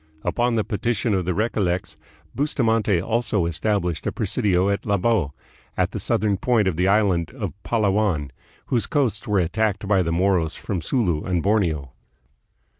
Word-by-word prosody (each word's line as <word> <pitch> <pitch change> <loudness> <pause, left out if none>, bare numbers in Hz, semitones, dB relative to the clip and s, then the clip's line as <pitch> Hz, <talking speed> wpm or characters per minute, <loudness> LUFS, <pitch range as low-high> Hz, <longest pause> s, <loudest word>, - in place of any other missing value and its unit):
Upon 120 0 +1
the 110 - +1
petition 115 +2 -1
of 95 -2 0
the 90 -1 -1
Recollects, 95 -6 -1 0.4
Bustamante 115 - +1
also 110 -1 0
established 90 0 -1
a - - 0
presidio 95 -2 +1
at 100 0 0
Labo, 100 -7 +1 0.4
at - - +1
the - - -4
southern 105 -2 0
point 115 -2 +2
of 95 - 0
the 90 +3 +1
island 95 -5 +2
of - - -4
Palawan, 100 - 0 0.3
whose 120 -3 0
coasts 130 -9 0
were 105 -1 +1
attacked 100 +3 0
by 100 -2 +3
the 85 -2 -1
Moros 85 -2 +1
from 95 -5 -4
Sulu 85 - 0
and 90 -3 -1
Borneo. 85 - +1
100 Hz, 155 wpm, -23 LUFS, 90-110 Hz, 0.4 s, by